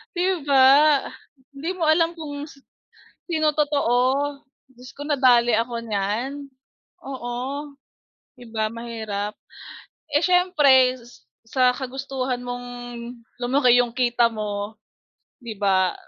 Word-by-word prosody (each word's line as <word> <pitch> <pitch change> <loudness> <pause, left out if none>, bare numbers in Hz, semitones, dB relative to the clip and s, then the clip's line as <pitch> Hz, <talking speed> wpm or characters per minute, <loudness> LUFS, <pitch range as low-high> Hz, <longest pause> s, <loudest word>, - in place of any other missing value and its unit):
'Di 355 -4 0
ba? 275 +2 +5 0.4
Hindi 285 +5 -5
mo 345 - -3
alam 330 +2 +3
kung 295 -2 -7
si 275 -2 -17 0.7
sino 310 -2 +1
totoo, 290 -5 +2 0.7
Diyos 250 0 -14
ko 285 - -10
nadali 250 -5 +4
ako 235 0 -2
niyan, 225 +8 -3 0.6
oo, 245 -3 -6 1.0
'di 245 - -13
ba 220 0 0
mahirap. 220 -3 -5 0.8
Eh, 295 +3 +2
siyempre 295 -9 +4 0.5
sa 255 +1 +3
kagustuhan 265 -1 -4
mong 245 0 -6 0.8
lumaki 250 -1 +4
'yong 245 -1 +2
kita 240 -2 +2
mo 210 0 -4 0.7
'di 235 -2 -6
ba 190 -2 +2
255 Hz, 110 wpm, -23 LUFS, 235-290 Hz, 1.0 s, ba